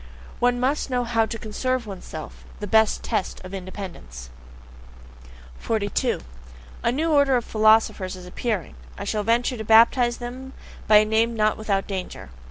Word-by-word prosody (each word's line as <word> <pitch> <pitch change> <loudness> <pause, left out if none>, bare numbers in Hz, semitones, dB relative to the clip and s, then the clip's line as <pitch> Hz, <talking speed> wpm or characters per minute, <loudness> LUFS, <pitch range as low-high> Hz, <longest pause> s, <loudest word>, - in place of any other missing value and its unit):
One 245 0 +2
must 275 +3 0
know 250 -1 0
how 230 -2 +1
TO 230 - -5
CONSERVE 245 +3 -2
ONESELF 180 -6 -9 0.2
the 210 - -4
best 220 +2 +3
test - - -2
of 185 - -9
independence. 180 - -8 1.3
42. 220 +3 -1 0.6
A 235 - +1
new 315 +6 0
order 280 -3 +4
of 240 - 0
philosophers 215 -3 +3
is 180 -1 -11
appearing; 195 - -3 0.2
I - - -5
shall 210 - -1
venture 235 +3 +1
to 220 - -5
baptize 235 +2 +5
them 255 +2 -8 0.3
by 215 - +6
a 210 - +5
name 225 +2 +1
not 215 -1 +2
without 200 -3 -1
danger. 185 - -6
220 Hz, 155 wpm, -24 LUFS, 200-245 Hz, 1.3 s, by